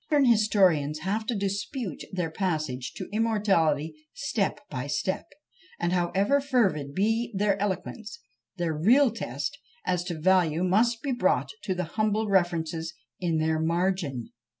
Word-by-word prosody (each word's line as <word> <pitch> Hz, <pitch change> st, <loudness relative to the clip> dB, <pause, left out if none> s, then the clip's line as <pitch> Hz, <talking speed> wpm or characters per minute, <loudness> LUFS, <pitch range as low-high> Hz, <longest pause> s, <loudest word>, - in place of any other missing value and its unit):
Modern 290 Hz, -3 st, +4 dB
historians 190 Hz, -, +3 dB
have 210 Hz, +5 st, -2 dB
to 240 Hz, -, 0 dB
dispute 200 Hz, -, -3 dB
their 180 Hz, -4 st, -2 dB
passage 155 Hz, -10 st, -2 dB
to -, -, -6 dB
immortality 195 Hz, -9 st, +2 dB, 0.2 s
step 230 Hz, -8 st, -1 dB
by 130 Hz, -1 st, -4 dB
step; 190 Hz, +4 st, -2 dB, 0.5 s
and 175 Hz, +1 st, 0 dB
however 195 Hz, +10 st, +2 dB
fervid 195 Hz, -, +1 dB
be 225 Hz, +4 st, +1 dB
their 200 Hz, 0 st, +2 dB
eloquence, 205 Hz, +2 st, -3 dB, 0.4 s
their 170 Hz, -2 st, -1 dB
real 235 Hz, -, +4 dB
test 150 Hz, -, -4 dB, 0.3 s
as 180 Hz, -1 st, 0 dB
to 170 Hz, -3 st, -4 dB
value 175 Hz, -1 st, +3 dB
must 230 Hz, +5 st, +2 dB
be 280 Hz, -, -1 dB
brought 185 Hz, -, +1 dB, 0.2 s
to 190 Hz, -3 st, -1 dB
the 180 Hz, -, -1 dB
humble 215 Hz, +4 st, 0 dB
references 170 Hz, -3 st, 0 dB, 0.2 s
in 170 Hz, -3 st, 0 dB
their 160 Hz, 0 st, +1 dB
margin. 165 Hz, -6 st, -1 dB
185 Hz, 140 wpm, -27 LUFS, 160-215 Hz, 0.5 s, Modern